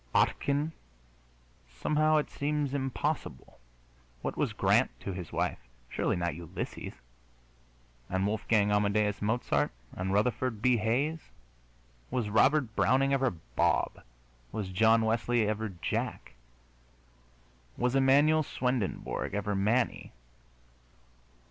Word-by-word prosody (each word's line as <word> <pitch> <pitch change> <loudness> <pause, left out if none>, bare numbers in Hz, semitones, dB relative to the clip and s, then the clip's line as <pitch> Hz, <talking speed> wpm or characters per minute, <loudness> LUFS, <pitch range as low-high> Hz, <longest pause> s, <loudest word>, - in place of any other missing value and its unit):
Ottchen? 145 +3 +2 1.0
Somehow 155 - +2
it 150 - -1
seems 145 -1 -1
impossible. 135 - -3 0.6
What - - -2
was - - 0
Grant - - +3
to 100 - -4
his 90 -4 -7
wife? - - -1 0.3
Surely - - 0
not 85 -1 -1
Ulysses! 85 -1 -6 1.2
And 95 +1 0
Wolfgang 105 0 +1
Amadeus 105 0 +1
Mozart? 110 +4 +1 0.3
And 95 +1 -2
Rutherford 115 +2 0
B. 125 +2 +3
Hayes? 135 +9 -1 0.8
Was 120 -5 -1
Robert 130 +2 +3
Browning 135 +2 +3
ever 135 -1 +3
Bob? 60 - -1 0.5
Was 100 -4 -4
John 110 +4 +4
Wesley 115 0 +1
ever 110 +1 -1
Jack? 90 -3 -4 1.4
Was 125 0 +1
Emmanuel 140 +4 +5
Swendenborg 125 -8 -2
ever 105 0 -1
Manny? 110 +6 0
115 Hz, 105 wpm, -30 LUFS, 105-135 Hz, 1.4 s, Emmanuel